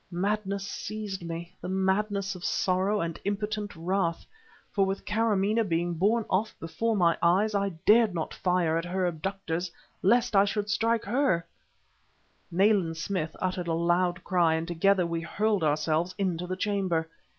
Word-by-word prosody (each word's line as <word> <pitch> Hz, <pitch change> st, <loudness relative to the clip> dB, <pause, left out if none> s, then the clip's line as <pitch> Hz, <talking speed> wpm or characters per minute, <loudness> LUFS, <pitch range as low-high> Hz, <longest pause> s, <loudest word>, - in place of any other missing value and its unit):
Madness 200 Hz, +2 st, -1 dB
seized 205 Hz, -1 st, -5 dB
me, 170 Hz, +1 st, -6 dB
the -, -, -5 dB
madness 195 Hz, +1 st, 0 dB
of 180 Hz, -2 st, -10 dB
sorrow 190 Hz, +3 st, +1 dB
and 165 Hz, -1 st, -3 dB
impotent 210 Hz, 0 st, -3 dB
wrath. 170 Hz, 0 st, -1 dB, 0.5 s
For, 200 Hz, -, +2 dB
with 195 Hz, 0 st, -2 dB
Kâramaneh 215 Hz, 0 st, +1 dB
being 170 Hz, +1 st, 0 dB
borne 210 Hz, +7 st, +2 dB
off 210 Hz, +4 st, 0 dB
before 225 Hz, +7 st, -1 dB
my 170 Hz, -4 st, +3 dB
eyes, 190 Hz, +6 st, +3 dB
I 200 Hz, -1 st, +1 dB, 0.2 s
dared 225 Hz, 0 st, +6 dB
not 160 Hz, -, -3 dB
fire 180 Hz, -3 st, +1 dB
at 165 Hz, -, -5 dB
her 185 Hz, +1 st, -1 dB
abductors 175 Hz, 0 st, -3 dB, 0.3 s
lest 235 Hz, +3 st, +3 dB
I 195 Hz, -, +7 dB
should 205 Hz, 0 st, -2 dB
strike 230 Hz, +2 st, +1 dB
her! 210 Hz, -6 st, +1 dB, 1.0 s
Nayland 185 Hz, -2 st, +2 dB
Smith 165 Hz, -2 st, -3 dB
uttered 185 Hz, -1 st, -2 dB
a 165 Hz, -, 0 dB
loud 175 Hz, +2 st, +1 dB
cry, 170 Hz, -4 st, +2 dB
and 160 Hz, +1 st, -3 dB
together 180 Hz, +2 st, +2 dB
we 170 Hz, -1 st, -2 dB
hurled 205 Hz, +3 st, 0 dB
ourselves 155 Hz, +3 st, +1 dB
into 180 Hz, -3 st, -1 dB
the 185 Hz, +1 st, -3 dB
chamber. 185 Hz, -5 st, 0 dB
190 Hz, 155 wpm, -28 LUFS, 170-205 Hz, 1.0 s, I